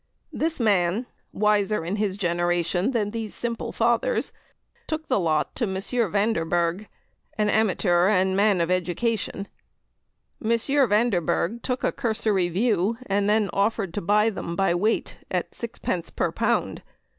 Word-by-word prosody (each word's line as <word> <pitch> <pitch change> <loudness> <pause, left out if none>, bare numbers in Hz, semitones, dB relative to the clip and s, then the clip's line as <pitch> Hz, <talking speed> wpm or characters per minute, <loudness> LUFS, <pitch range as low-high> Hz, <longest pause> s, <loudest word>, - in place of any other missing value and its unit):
This 320 -1 -1
man, 205 0 +2 0.3
wiser 210 -3 +1
in 190 +5 -2
his 200 -2 -1
generation 175 +1 0
than 215 -5 -1
these 225 -2 -5
simple 235 -2 -3
fathers, 235 - +1 0.5
took 315 0 -3
the 255 - +2
lot 155 -4 0
to 240 - +1
M. 190 -2 -3
Vanderberg, 200 -4 0 0.5
an 210 -1 +2
amateur 185 -4 +2
and 190 -2 +2
man 200 -2 +3
of 170 +1 0
education. 195 +3 -1 1.0
M. 220 - 0 0.4
Vanderberg 210 0 +1
took 250 +1 -3
a - - +2
cursory 215 -5 0
view, 205 +2 +1
and 200 -1 +1
then 210 -1 +2
offered 200 -3 0
to 205 - -3
buy 210 +5 +3
them 170 -4 -5
by 195 -1 +2
weight 210 +6 0
at - - -2
sixpence 230 -7 -4
per - - -1
pound. - - -1
205 Hz, 140 wpm, -25 LUFS, 180-225 Hz, 1.0 s, man